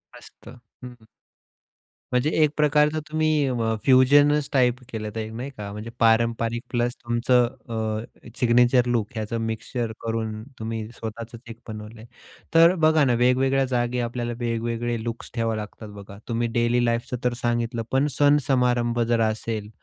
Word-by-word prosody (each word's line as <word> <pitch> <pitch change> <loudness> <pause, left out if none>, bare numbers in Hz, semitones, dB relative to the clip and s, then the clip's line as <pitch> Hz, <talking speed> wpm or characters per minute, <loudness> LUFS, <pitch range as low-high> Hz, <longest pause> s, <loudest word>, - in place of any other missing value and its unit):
मस्त. - - -16
हं, 125 - -11 0.4
हं. 110 - -20 1.1
म्हणजे 125 +4 +2
एक 150 - +4
प्रकारचं 150 +1 +3
तुम्ही 155 0 +1 0.2
अ, 115 -3 0
फ्युजनच 145 +3 +5
टाइप 125 -3 +3
केलं 110 -3 -5
तर 110 -1 -4
नाही 120 +5 -5
का 100 -1 -6
म्हणजे 105 +3 -7
पारंपरिक 115 0 +2
प्लस 120 0 0
तुमचं 120 +1 +2 0.2
अ, 110 0 -4
सिग्नेचर 125 +1 +4
लूक 120 -4 0
ह्याच 110 0 -4
मिक्सचर 115 +1 -3
करून 110 -1 -3 0.2
तुम्ही 110 -1 -4
स्वतःच 115 0 -6 0.2
एक 115 0 -9
बनवलंय. 110 +1 -9 0.5
तर 165 +1 +8
अ, - - -2
बघा 155 -1 +4
ना, 125 - +2
वेगवेगळ्या 130 +3 +2
जागी 125 -1 -1
आपल्याला 120 0 -3
वेगवेगळे 115 0 -2
लुक्स 115 0 -6
ठेवावे 115 -2 0
लागतात 105 +1 -8
बघा 100 0 -11
तुम्ही 120 0 -1
डेली 120 +1 +2
लाईफच 120 +1 -2
तर 125 0 +1
सांगितलं, 120 0 -1
पण 135 +2 +2
सण-समारंभ 125 -5 +2
जर 115 -1 +2
असेल, 110 -1 -2
120 Hz, 150 wpm, -24 LUFS, 115-125 Hz, 1.1 s, तर